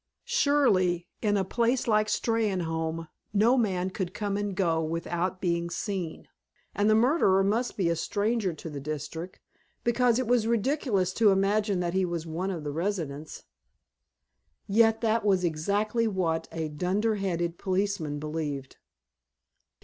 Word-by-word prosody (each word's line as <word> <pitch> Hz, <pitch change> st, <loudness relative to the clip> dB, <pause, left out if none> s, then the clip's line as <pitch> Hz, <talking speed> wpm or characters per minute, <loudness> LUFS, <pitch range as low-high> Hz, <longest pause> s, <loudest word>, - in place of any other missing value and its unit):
Surely, 250 Hz, -, +2 dB
in 205 Hz, -2 st, +2 dB
a 195 Hz, -, +1 dB
place 235 Hz, +6 st, 0 dB
like 215 Hz, -1 st, +3 dB
Steynholme 165 Hz, -8 st, -1 dB, 0.3 s
no 220 Hz, +5 st, +4 dB
man 190 Hz, -6 st, 0 dB
could 185 Hz, 0 st, -4 dB
come 205 Hz, -2 st, -2 dB
and 205 Hz, -1 st, -2 dB
go 170 Hz, -4 st, +1 dB
without 170 Hz, +3 st, -2 dB
being 170 Hz, -2 st, -1 dB
seen, 180 Hz, -2 st, -4 dB, 0.5 s
and 205 Hz, +2 st, +2 dB
the 215 Hz, -, +5 dB
murderer 220 Hz, -, +4 dB
must 225 Hz, +5 st, 0 dB
be 190 Hz, -4 st, +1 dB
a 170 Hz, -, +2 dB
stranger 205 Hz, +3 st, 0 dB
to 160 Hz, +1 st, -9 dB
the 145 Hz, -3 st, -6 dB
district, 155 Hz, +5 st, -6 dB, 0.4 s
because 240 Hz, 0 st, +3 dB
it 255 Hz, -, 0 dB
was 235 Hz, -1 st, +2 dB
ridiculous 230 Hz, -, +1 dB
to 220 Hz, 0 st, +4 dB
imagine 200 Hz, 0 st, +2 dB
that 175 Hz, -1 st, -1 dB
he 190 Hz, 0 st, +2 dB
was 170 Hz, -2 st, -2 dB
one 170 Hz, +4 st, -3 dB
of 170 Hz, -5 st, -4 dB
the 145 Hz, -, -3 dB
residents. 160 Hz, -3 st, -4 dB, 1.2 s
Yet 225 Hz, +2 st, +4 dB
that 225 Hz, -1 st, +1 dB
was 195 Hz, -3 st, +2 dB
exactly 205 Hz, +8 st, 0 dB
what 175 Hz, -6 st, -1 dB
a 160 Hz, -1 st, -3 dB
dunderheaded 180 Hz, 0 st, -1 dB
policeman 190 Hz, -6 st, -1 dB
believed. 150 Hz, -3 st, -4 dB
190 Hz, 140 wpm, -28 LUFS, 170-215 Hz, 1.2 s, the